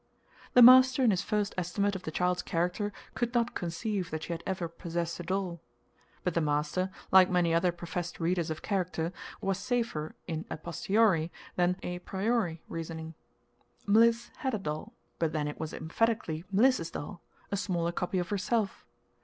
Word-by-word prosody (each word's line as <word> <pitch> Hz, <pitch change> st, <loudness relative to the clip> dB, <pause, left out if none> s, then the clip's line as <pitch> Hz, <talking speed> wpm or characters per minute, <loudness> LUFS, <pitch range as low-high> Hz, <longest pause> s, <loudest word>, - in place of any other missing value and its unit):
The 250 Hz, -, +10 dB
master 260 Hz, +2 st, +8 dB
in 235 Hz, -, +5 dB
his 185 Hz, -, +1 dB
first 210 Hz, -1 st, -1 dB
estimate 200 Hz, +3 st, 0 dB
of 190 Hz, -, -4 dB
the 160 Hz, -, -5 dB
child's 180 Hz, +2 st, 0 dB
character 180 Hz, +6 st, -1 dB, 0.2 s
could 240 Hz, 0 st, -2 dB
not 235 Hz, 0 st, +2 dB
conceive 180 Hz, +2 st, -2 dB
that 155 Hz, 0 st, -4 dB
she 175 Hz, -, -3 dB
had 165 Hz, -, -5 dB
ever 185 Hz, -3 st, -1 dB
possessed 170 Hz, 0 st, -4 dB
a -, -, -4 dB
doll. 180 Hz, -2 st, -2 dB, 0.6 s
But 180 Hz, -, 0 dB
the 170 Hz, -, +1 dB
master, 150 Hz, +5 st, 0 dB, 0.2 s
like 185 Hz, -1 st, +8 dB
many 175 Hz, -2 st, +2 dB
other 170 Hz, +2 st, +3 dB
professed 175 Hz, 0 st, -5 dB
readers 170 Hz, 0 st, 0 dB
of 155 Hz, -, -5 dB
character, 180 Hz, -4 st, -1 dB, 0.3 s
was 195 Hz, -1 st, 0 dB
safer 225 Hz, -10 st, -2 dB
in 160 Hz, -2 st, -4 dB
a -, -, -4 dB
posteriori 170 Hz, 0 st, +1 dB, 0.2 s
than 180 Hz, 0 st, +2 dB
a 180 Hz, 0 st, -3 dB
priori 190 Hz, -3 st, -1 dB
reasoning. 160 Hz, -1 st, -6 dB, 0.7 s
Mliss 230 Hz, +3 st, +4 dB
had 265 Hz, -5 st, -1 dB
a -, -, 0 dB
doll, 155 Hz, -5 st, -5 dB, 0.3 s
but 160 Hz, -2 st, 0 dB
then 150 Hz, -2 st, 0 dB
it 150 Hz, -, -6 dB
was 160 Hz, -1 st, -4 dB
emphatically 170 Hz, -1 st, -1 dB
Mliss's 210 Hz, -4 st, +3 dB
doll 170 Hz, +4 st, -7 dB, 0.3 s
a -, -, +1 dB
smaller 175 Hz, -4 st, -1 dB
copy 180 Hz, +2 st, -2 dB
of 180 Hz, 0 st, -1 dB
herself. 205 Hz, +1 st, -1 dB
180 Hz, 170 wpm, -30 LUFS, 165-205 Hz, 0.7 s, The